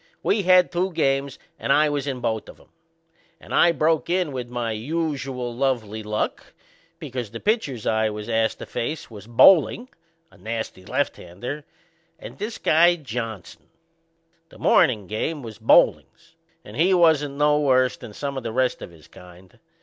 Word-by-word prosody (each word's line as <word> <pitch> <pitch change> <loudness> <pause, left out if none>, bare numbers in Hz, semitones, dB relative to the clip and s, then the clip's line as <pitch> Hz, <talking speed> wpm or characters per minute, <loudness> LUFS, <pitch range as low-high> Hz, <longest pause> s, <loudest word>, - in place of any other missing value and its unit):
We 205 - +2
had 185 -1 +4
two 185 +2 -1
games 140 -3 0 0.2
and - - -1
I 150 +2 +5
was 145 -1 -2
in 130 -3 -3
both 110 -2 -2
of - - -14
'em. - - -22 0.7
And - - -11
I 170 - +5
broke 160 +1 0
in 180 -3 0
with 125 -2 -5
my 120 -2 -3
usual 135 -1 -3
lovely 115 -4 -1
luck, 105 0 -4 0.4
because 130 -8 -6
the - - -8
pitchers 175 - -1
I 110 0 +1
was 105 0 -7
ast 110 -1 0
to - - -8
face 150 +2 -5
was 105 -1 -11
Boehling, 185 - +5 0.4
a - - -21
nasty 110 -4 -5
lefthander, 120 +17 -4 0.5
and - - -11
this 215 +3 -4
guy 170 +3 +4
Johnson. 115 - -7 0.8
The - - -16
mornin' 110 -6 +3
game 130 - -3
was 110 -4 -9
Boebling's - - +2 0.3
and 105 - -11
he 185 +4 +4
wasn't 155 -5 +3
no 150 +1 +3
worse 130 -3 +2
than - - -11
some 140 +4 -5
o' - - -12
the 115 -2 -5
rest 130 +1 0
of - - -8
his 80 -3 -18
kind. 90 0 -16
130 Hz, 165 wpm, -23 LUFS, 110-155 Hz, 0.8 s, I